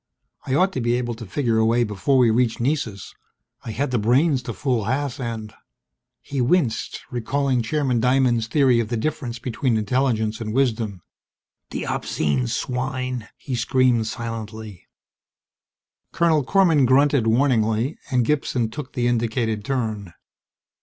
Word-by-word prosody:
I 130 - +1
ought 185 +6 +3
to 130 - -2
be 120 0 +1
able 120 -1 -1
to 115 -1 -9
figure 115 +1 0
a 110 - +3
way 120 +1 +3
before 105 +5 0
we 120 -3 +5
reach 120 0 +1
Nessus. 120 -7 -2 0.5
I - - -7
had 130 +5 -2
the 125 - +1
brains 130 +6 +3
to 115 -2 -5
fool 125 -7 -1
Haas 140 +3 -2
and... 115 -4 -5 0.7
He 140 -2 -3
winced, 125 -3 0
recalling 130 +1 0
Chairman 130 0 0
Diamond's 125 -2 +2
theory 130 -2 +3
of 115 - -1
the 120 - -2
difference 125 -1 -3
between 120 0 -1
intelligence 110 -1 0
and 110 0 -4
wisdom. 110 -8 0 0.7
The - - -4
obscene 70 -5 -1
swine! 125 - -3
he 135 - -7
screamed 120 -1 +2
silently. 110 -3 -6 1.2
Colonel 160 -4 +2
Korman 165 -4 +4
grunted 140 -2 +3
warningly, 115 +1 +1
and 125 -2 +2
Gibson 125 -5 0
took 140 +1 -7
the 120 - -1
indicated 115 -2 0
turn. 110 -9 -3
120 Hz, 145 wpm, -22 LUFS, 110-135 Hz, 1.2 s, we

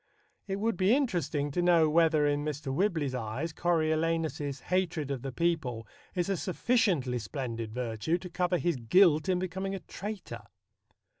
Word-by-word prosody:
It 195 - -1
would 215 0 -1
be 190 +6 +4
interesting 170 - 0
to 175 - 0
know 170 -2 +5
whether 160 -1 +4
in 145 0 +1
Mr. 150 -2 -3
Whibley's 160 -5 0
eyes 125 +7 -3
Coriolanus's 160 -4 0
hatred 175 -6 -1
of 135 -3 -3
the 135 +1 -4
people 135 -7 -1 0.3
is 175 -2 0
a 195 - +1
sufficiently 180 - +1
splendid 115 -1 -5
virtue 120 +6 -1
to 180 +1 -8
cover 180 0 +1
his 175 -4 0
guilt 155 - +4
in 185 - +3
becoming 190 +2 -3
a - - -4
traitor. 205 +1 -7
165 Hz, 155 wpm, -30 LUFS, 140-180 Hz, 0.3 s, know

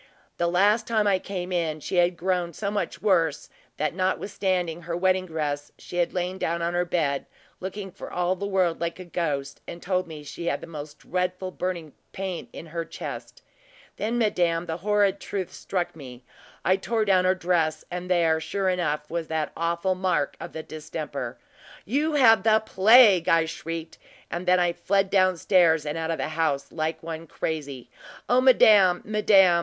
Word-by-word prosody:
The 170 - +1
last 200 +6 +3
time 220 -2 +2
I 195 -2 +3
came 185 -1 -5
in, 165 -3 -1
she 180 - -3
had 175 0 +3
grown 180 -1 -1
so 200 +4 -3
much 205 0 -3
worse, 165 -7 +1 0.3
that 155 - -1
notwithstanding 185 -2 -1
her 170 +1 -4
wedding 185 0 +1
dress, 145 -3 -3
she 175 - -8
had 175 -1 +1
lain 180 +1 -3
down 170 +1 -1
on 170 +1 -1
her 175 0 +1
bed, 150 -5 -1 0.3
looking 190 +1 -6
for 195 - -9
all 180 +1 0
the 200 +2 -4
world 185 -4 +1
like 170 0 -2
a 185 - -8
ghost, 145 -5 -3
and 170 - -7
told 185 0 -1
me 155 -2 -9
she 170 +3 -7
had - - 0
the - - -9
most 150 -2 -8
dreadful 180 +1 -3
burning 175 -5 -4 0.2
pain 190 -2 -4
in - - -9
her 165 +1 -4
chest. - - -8 0.5
Then, 225 +3 -1
madame, 175 -7 +1
the 165 -1 -4
horrid 200 +1 +2
truth 190 -3 -4
struck 180 -4 -3
me 130 -5 -11 0.4
I 185 +1 +4
tore 220 +2 -1
down 185 -2 +3
her 185 +1 +3
dress, 170 -3 0
and 180 +1 -5
there, 165 -3 +3
sure 190 +4 -1
enough, 150 -5 -1
was 170 0 -3
the 160 -2 -2
awful 170 +3 0
mark 185 -6 0
of - - -7
the 160 - -5
distemper. 155 -5 -6 0.5
`You 295 +7 +1
have 225 -6 +6
the 220 +1 +4
plague!' 210 -3 +6
I 165 -1 +4
shrieked; 165 0 -6 0.3
and 175 +2 -4
then 180 0 +5
I 175 -1 +2
fled 195 +2 0
down 185 -2 +3
stairs 165 -4 +3
and 150 +1 -3
out 165 0 -3
of 165 - -1
the - - -2
house, 155 -3 -1
like 160 0 -3
one 165 0 -6
crazy. 140 -7 -5 0.4
O 250 +1 +4
madame, 205 -8 +6
madame! 195 -4 +5
175 Hz, 185 wpm, -25 LUFS, 160-190 Hz, 0.5 s, have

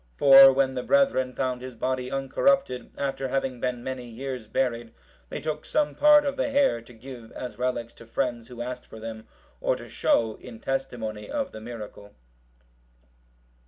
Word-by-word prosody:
For 135 - +9
when 135 0 +1
the 125 - -2
brethren 270 - +2
found 130 -2 -1
his 130 -1 -8
body 130 +1 -2
uncorrupted, 135 - +1
after 135 -1 -2
having 130 -1 -2
been 125 -1 -2
many 130 -2 -5
years 125 0 -6
buried, 115 -1 -2 0.3
they - - -4
took 155 -1 -4
some 300 -1 0
part 295 0 +6
of 280 - -2
the - - 0
hair, 275 - +2
to 115 - -16
give, 120 -1 -11
as 125 -3 -7
relics, 120 -2 -2
to 115 - -15
friends 120 -1 -2
who 120 -1 -6
asked 125 0 -6
for 110 - -11
them, 110 0 -8 0.3
or - - +1
to - - -10
show, 110 -2 +1
in 115 - -11
testimony 120 -6 -4
of 280 -2 -2
the 110 - -9
miracle. 110 -3 -9
125 Hz, 170 wpm, -26 LUFS, 115-135 Hz, 0.3 s, For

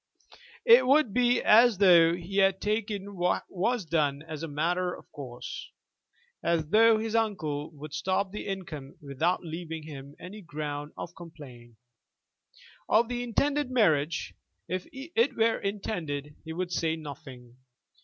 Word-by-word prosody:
It 470 - +7
would 275 -6 +4
be 245 0 +3
as 230 0 +6
though 170 -4 +6
he 180 +3 -6
had 195 -1 +4
taken 205 -1 -2
what 180 0 0
was 210 +3 -1
done 150 -3 0
as 160 -2 -7
a 165 - -3
matter 175 +5 0
of - - -16
course, 125 -4 -8 0.7
as 165 -3 0
though 225 +3 +6
his 220 +1 -3
uncle 160 -10 -1
could 150 0 -8
stop 185 +5 -1
the 210 - -6
income 160 -8 -6
without 155 +5 -1
leaving 165 -1 -6
him 140 -2 -10
any 200 +5 -9
ground 150 -3 -5
of 175 - -7
complaint. 140 -9 -12 1.1
Of 230 +2 +4
the 245 0 -2
intended 275 +4 0
marriage, 165 - +1 0.3
if 185 +1 -3
it 270 -2 -1
were 225 0 +2
intended, 165 -8 -4
he 160 - -6
would 180 +2 -3
say 160 -2 0
nothing. 130 -5 -10
175 Hz, 145 wpm, -28 LUFS, 150-215 Hz, 1.1 s, It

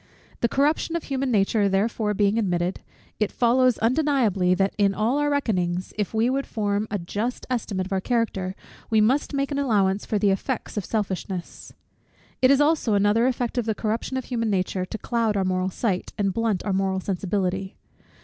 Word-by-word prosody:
The 235 - +1
corruption 300 +4 +1
of 335 - -2
human 270 -1 -2
nature 205 -2 +2
therefore 210 +2 0
being 205 +2 +2
admitted, 180 -3 -1 0.4
it 215 -2 +1
follows 250 +1 +3
undeniably, 230 - +2
that 195 +1 +1
in 200 -1 +3
all 230 +7 +1
our 295 0 +1
reckonings, 185 -11 -1
if 210 -2 -2
we 225 +1 +2
would 270 +2 -1
form 205 -1 -1
a 205 - -1
just 205 +7 -3
estimate 205 -6 -1
of 195 - -5
our 190 - 0
character, 195 -5 -1 0.3
we 220 - +3
must 250 +7 +2
make 275 0 -1
an 280 - -1
allowance 205 -7 +1
for 215 - -1
the 205 -1 +3
effects 230 +6 -3
of 210 - -2
selfishness. 190 -4 -4 0.7
It 255 - +6
is 275 0 +5
also 290 -7 +2
another 205 +4 +3
effect 245 -1 -1
of 230 - -2
the 220 - 0
corruption 225 +5 -2
of 260 - -4
human 230 -3 -1
nature, 185 -1 -1
to 205 - -6
cloud 225 -3 0
our 190 - +1
moral 185 0 0
sight, 190 -1 -2
and 195 -3 0
blunt 225 -3 -1
our 200 - 0
moral 190 0 0
sensibility. 190 0 -2
215 Hz, 190 wpm, -24 LUFS, 195-245 Hz, 0.7 s, It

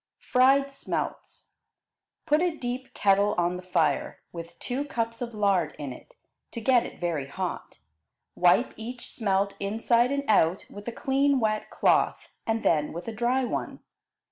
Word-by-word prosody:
Fried 275 +2 +3
Smelts 275 - -5 0.7
Put 305 0 +3
a 350 -3 0
deep 250 0 -5
kettle 200 +1 +3
on 175 +1 +1
the 180 - -6
fire, 185 0 0
with 170 0 -9
two 260 +3 -3
cups 230 -4 -3
of 235 -2 -4
lard 195 -7 +1
in 140 -3 -5
it, - - -16 0.4
to 235 - -4
get 245 +1 +3
it - - -13
very 165 -6 -2
hot. 180 +5 -5 0.6
Wipe 180 +8 +3
each 240 +2 -8
smelt 200 -2 0
inside 230 +4 +2
and 280 0 0
out 185 -4 +3
with 205 +2 -10
a - - -1
clean 275 +3 +2
wet 215 -2 0
cloth, - - +1
and 225 0 0
then 150 -2 +2
with 170 +5 -7
a 230 - -3
dry 240 +4 +1
one. 245 - -3
225 Hz, 160 wpm, -27 LUFS, 185-255 Hz, 0.7 s, Fried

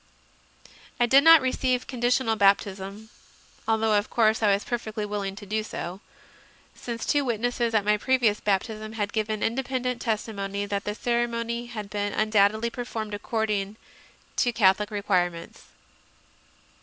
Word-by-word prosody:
I 240 - +5
did 270 +4 +5
not 325 -3 +8
receive 255 -1 0
condi 240 -2 -4
tional 245 -2 +2
baptism 200 +1 0 0.6
although 220 -1 +2
of 205 0 0
course 220 -1 +2
I 210 -2 +4
was 200 +1 +1
perfectly 220 -3 -3
willing 200 -2 -3
to 205 - -10
do 215 +2 -1
so 185 -3 -6 0.7
since 235 -2 -6
two 290 -1 +2
witnesses 240 -1 -1
at 205 -2 +2
my 210 0 +3
previous 235 -3 +2
baptism 215 +2 -2
had 205 -2 -3
given 215 -1 -1
independent 250 0 -2
testimony 205 -3 -2
that 200 0 -3
the 210 - -3
ceremony 235 0 -1
had 215 -4 -7
been 205 -1 -2
undoubtedly 215 +1 +2
performed 230 -4 -5
accord 220 +1 -2
ing 200 0 -2 0.6
to 245 - +2
Catholic 210 -2 +3
requirements. 180 -5 -2
220 Hz, 145 wpm, -26 LUFS, 205-235 Hz, 0.7 s, not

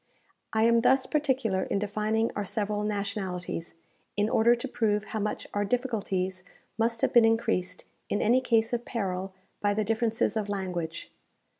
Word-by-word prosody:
I 220 0 +2
am 230 0 +5
thus 260 +2 +4
particular 260 -10 0
in - - -1
defining 215 +2 0
our 205 - -1
several 210 +1 -1
nationalities, 200 -5 -3 0.4
in 205 +1 +2
order 235 +2 +5
to 240 +3 -5
prove 210 -4 0
how 220 - -4
much 210 +1 -2
our 205 - +1
difficulties 200 -5 -1 0.3
must 230 +1 0
have - - +1
been 240 - +7
increased, 225 -5 +1 0.2
in 205 - 0
any 245 +4 +4
case 230 -2 +2
of 240 0 0
peril, 195 -5 -3 0.3
by 205 0 +2
the 215 - +1
differences 225 +2 0
of 210 -2 -1
language. 180 -4 -4
215 Hz, 160 wpm, -28 LUFS, 200-230 Hz, 0.4 s, been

